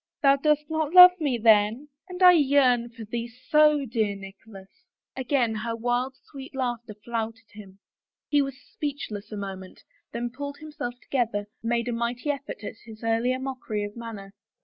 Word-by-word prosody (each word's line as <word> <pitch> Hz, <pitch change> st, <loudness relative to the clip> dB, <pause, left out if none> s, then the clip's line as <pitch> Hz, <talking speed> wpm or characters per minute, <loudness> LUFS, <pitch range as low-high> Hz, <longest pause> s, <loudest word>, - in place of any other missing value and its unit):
" -, -, -67 dB
Thou 275 Hz, 0 st, +6 dB
dost 300 Hz, +1 st, +1 dB
not 315 Hz, 0 st, -2 dB
love 360 Hz, 0 st, +12 dB
me, 285 Hz, -6 st, 0 dB
then? 220 Hz, +5 st, +3 dB, 0.2 s
And 365 Hz, 0 st, -3 dB
I 360 Hz, -, +10 dB
yearn 265 Hz, -6 st, +3 dB
for 230 Hz, -1 st, -10 dB
thee 235 Hz, +2 st, -4 dB, 0.2 s
so, 300 Hz, -2 st, +5 dB
dear 220 Hz, -4 st, -1 dB
Nicholas! 195 Hz, 0 st, -12 dB, 0.3 s
" -, -, -68 dB
Again 255 Hz, -3 st, 0 dB
her 230 Hz, +2 st, -3 dB
wild, 245 Hz, +3 st, -1 dB
sweet 270 Hz, 0 st, -11 dB
laughter 240 Hz, -4 st, -3 dB
flouted 225 Hz, 0 st, -5 dB
him. 195 Hz, -2 st, -13 dB, 0.5 s
He 290 Hz, -1 st, +3 dB
was 275 Hz, -1 st, -4 dB
speechless 225 Hz, -8 st, -6 dB
a 210 Hz, -, -5 dB
moment, 190 Hz, -2 st, -8 dB, 0.3 s
then 235 Hz, +1 st, -4 dB
pulling 285 Hz, +3 st, -7 dB
himself 295 Hz, -5 st, -6 dB
to -, -, -24 dB
gether, 230 Hz, -6 st, 0 dB, 0.2 s
made 235 Hz, 0 st, -1 dB
a -, -, -1 dB
mighty 235 Hz, +5 st, -1 dB
effort 280 Hz, -6 st, -7 dB
at 220 Hz, -, -7 dB
his 220 Hz, 0 st, -12 dB
earlier 230 Hz, +3 st, +1 dB
mockery 255 Hz, -5 st, -4 dB
of 205 Hz, 0 st, -6 dB
manner. 215 Hz, -4 st, -8 dB
240 Hz, 175 wpm, -26 LUFS, 220-280 Hz, 0.5 s, love